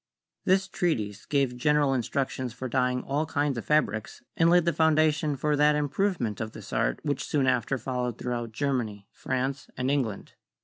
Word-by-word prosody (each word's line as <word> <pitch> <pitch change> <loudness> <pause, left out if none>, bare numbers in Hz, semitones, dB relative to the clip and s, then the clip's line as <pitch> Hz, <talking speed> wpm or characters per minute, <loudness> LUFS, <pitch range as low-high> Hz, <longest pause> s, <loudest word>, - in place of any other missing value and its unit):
This 190 +1 +3
treatise 110 - -2
gave 140 -4 +1
general 145 +2 +2
instructions 130 0 -2
for 130 +1 -5
dyeing 125 0 0
all 145 +3 -1
kinds 145 -3 0
of - - -8
fabrics, 110 -9 0
and 165 0 +4
laid 175 -1 +5
the 170 - +2
foundation 155 -1 +3
for 150 +3 0
that 150 +1 +4
improvement 150 - -1
of 110 0 -4
this - - -10
art - - +1
which 145 -3 -1
soon 140 -3 +1
after 130 +1 +1
followed 125 -1 -3
throughout 120 -2 -3
Germany, 115 -6 -2
France 130 +1 -2
84 - - -24
CHEMISTRY - - -3
and 130 +2 +1
England. 125 -8 -2
135 Hz, 180 wpm, -27 LUFS, 125-150 Hz, -, laid